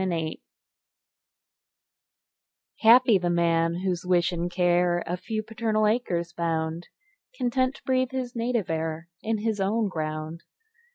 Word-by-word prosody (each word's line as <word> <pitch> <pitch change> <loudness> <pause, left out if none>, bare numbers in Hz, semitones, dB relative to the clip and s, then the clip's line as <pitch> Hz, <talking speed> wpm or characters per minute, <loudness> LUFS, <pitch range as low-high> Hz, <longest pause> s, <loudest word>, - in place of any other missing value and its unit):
Y 190 - 0
Z 180 - -1
Solitude 160 -1 -3 2.4
HAPPY 235 -1 +6
the 175 -1 -1
man, 170 -1 +2
whose 180 -2 -1
wish 180 -1 +2
and 175 0 -2
care 175 -1 +2
A 175 - -2
few 215 +4 -4
paternal 220 -1 0
acres 175 -7 0
bound, 165 0 -2 0.5
Content 255 +2 0
to - - -16
breathe 255 -1 +1
his 255 -1 -4
native 235 -5 -1
air 160 +1 -3
In 225 0 -1
his 215 -1 -1
own 210 +2 +1
ground. 155 0 -4
180 Hz, 135 wpm, -26 LUFS, 170-225 Hz, 2.4 s, HAPPY